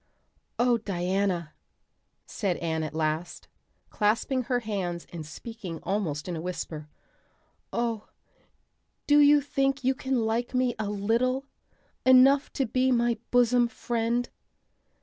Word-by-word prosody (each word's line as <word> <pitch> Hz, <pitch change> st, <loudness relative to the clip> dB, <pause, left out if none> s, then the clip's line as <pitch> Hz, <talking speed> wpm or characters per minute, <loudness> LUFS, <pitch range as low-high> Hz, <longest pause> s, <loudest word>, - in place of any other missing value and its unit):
"Oh, 240 Hz, -1 st, +3 dB
Diana," 185 Hz, -4 st, -1 dB, 0.7 s
said 190 Hz, -5 st, -2 dB
Anne 160 Hz, -1 st, -2 dB
at 155 Hz, -1 st, -5 dB
last, 160 Hz, +2 st, -2 dB, 0.4 s
clasping 230 Hz, +4 st, +1 dB
her 245 Hz, -1 st, 0 dB
hands 185 Hz, -6 st, -3 dB
and 165 Hz, -2 st, -5 dB
speaking 180 Hz, +2 st, -8 dB
almost 185 Hz, -7 st, -2 dB
in 175 Hz, -, -3 dB
a 160 Hz, -, -4 dB
whisper, 160 Hz, -3 st, -5 dB, 0.8 s
"oh, 230 Hz, -2 st, -2 dB, 1.0 s
do 290 Hz, 0 st, +5 dB
you 290 Hz, 0 st, +6 dB
think 275 Hz, 0 st, 0 dB
you 260 Hz, +1 st, +3 dB
can 260 Hz, -3 st, -1 dB
like 235 Hz, +3 st, -1 dB
me 250 Hz, -1 st, +2 dB
a 210 Hz, -2 st, -2 dB
little 235 Hz, +6 st, 0 dB, 0.6 s
enough 265 Hz, +2 st, +6 dB
to 270 Hz, -, 0 dB
be 255 Hz, +3 st, +1 dB
my 235 Hz, -2 st, +2 dB
bosom 245 Hz, 0 st, +4 dB
friend?" 235 Hz, +1 st, -2 dB
230 Hz, 125 wpm, -27 LUFS, 180-255 Hz, 1.0 s, you